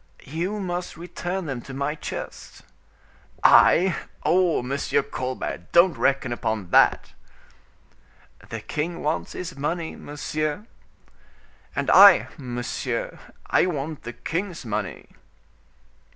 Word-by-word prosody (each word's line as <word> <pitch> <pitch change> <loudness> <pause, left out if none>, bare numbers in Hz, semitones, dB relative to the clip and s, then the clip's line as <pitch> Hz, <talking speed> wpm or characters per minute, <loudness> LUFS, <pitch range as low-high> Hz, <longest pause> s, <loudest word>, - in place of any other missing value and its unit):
"You 175 +9 -3
must 180 -3 -4
return 175 +2 -4
them 135 -5 -4
to 135 +2 -9
my 140 +2 -1
chest." 155 - -8 0.8
"I! 185 +1 +6 0.3
Oh! 180 -7 +2
Monsieur 135 +3 0
Colbert, 130 -8 -5
don't 170 +1 +6
reckon 135 -3 +1
upon 110 -6 -3
that." - - +4 1.4
"The - - -5
king 170 +3 -4
wants 155 +2 -2
his 180 -1 -6
money, 160 +4 -3
monsieur." 155 +5 -4 1.1
"And - - 0
I, - - +8
monsieur, 125 -2 -4 0.3
I - - +3
want 155 -2 -4
the 120 - -7
king's 175 - -4
money." 110 - -4
155 Hz, 110 wpm, -24 LUFS, 130-175 Hz, 1.4 s, I